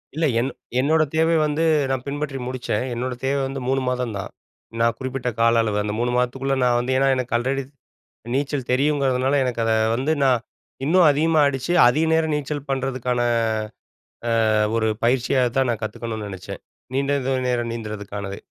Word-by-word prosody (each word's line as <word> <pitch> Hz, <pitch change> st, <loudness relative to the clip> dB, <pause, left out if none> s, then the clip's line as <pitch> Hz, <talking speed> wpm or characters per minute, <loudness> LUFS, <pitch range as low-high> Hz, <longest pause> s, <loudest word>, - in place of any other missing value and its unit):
இல்ல, 160 Hz, -, +1 dB
என் 130 Hz, +3 st, 0 dB, 0.3 s
என்னோட 155 Hz, +4 st, +3 dB
தேவை 160 Hz, +1 st, +3 dB
வந்து 150 Hz, +2 st, 0 dB, 0.3 s
நான் 130 Hz, -2 st, -1 dB
பின்பற்றி 145 Hz, -1 st, -3 dB
முடிச்சேன். 125 Hz, -3 st, -2 dB
என்னோட 125 Hz, +2 st, -3 dB
தேவை 140 Hz, +1 st, +1 dB
வந்து 135 Hz, -1 st, -5 dB
3 135 Hz, 0 st, +1 dB
மாதந்தான். 125 Hz, -6 st, -2 dB, 0.5 s
நான் 115 Hz, 0 st, +2 dB
குறிப்பிட்ட 130 Hz, -1 st, -3 dB
கால 115 Hz, 0 st, +4 dB
அளவு 105 Hz, -2 st, -1 dB
அந்த 105 Hz, 0 st, -2 dB
3 120 Hz, +1 st, 0 dB
மாதத்துக்குள்ள 135 Hz, +2 st, 0 dB
நான் 120 Hz, -1 st, +3 dB
வந்து 125 Hz, +2 st, -2 dB
ஏன்னா, 135 Hz, 0 st, +3 dB
எனக்கு 125 Hz, -1 st, -3 dB
ஆல்ரெடி 135 Hz, +3 st, -1 dB, 0.7 s
நீச்சல் 140 Hz, -2 st, -2 dB
தெரியும்ங்கிறதுனால, 135 Hz, -1 st, +1 dB
எனக்கு 125 Hz, -2 st, -2 dB
அத 115 Hz, -, +2 dB, 0.2 s
வந்து, 135 Hz, +6 st, 0 dB
நான் 130 Hz, -3 st, +3 dB, 0.4 s
இன்னும் 175 Hz, +3 st, +5 dB
அதிகமா 155 Hz, +2 st, +2 dB
அடிச்சு, 135 Hz, +4 st, -2 dB, 0.2 s
அதிக 155 Hz, +6 st, +2 dB
நேரம் 160 Hz, -1 st, +1 dB
நீச்சல் 145 Hz, 0 st, -4 dB
பண்ணறதுக்கான, 130 Hz, -2 st, -1 dB, 1.3 s
ஆ, -, -, +3 dB, 0.2 s
ஒரு 110 Hz, -1 st, +1 dB, 0.2 s
பயிற்சியாகதான் 130 Hz, +1 st, +2 dB
நான் 115 Hz, -1 st, -4 dB
கத்துக்கணும்னு 110 Hz, -1 st, -5 dB
நெனைச்சேன். 95 Hz, -1 st, -8 dB, 0.3 s
நீண்ட 140 Hz, +1 st, 0 dB
தூரம் 130 Hz, -1 st, 0 dB
நேரம் 120 Hz, -1 st, -1 dB
நீந்தறதுக்கானது. 105 Hz, -3 st, -6 dB
130 Hz, 155 wpm, -22 LUFS, 120-140 Hz, 1.3 s, இன்னும்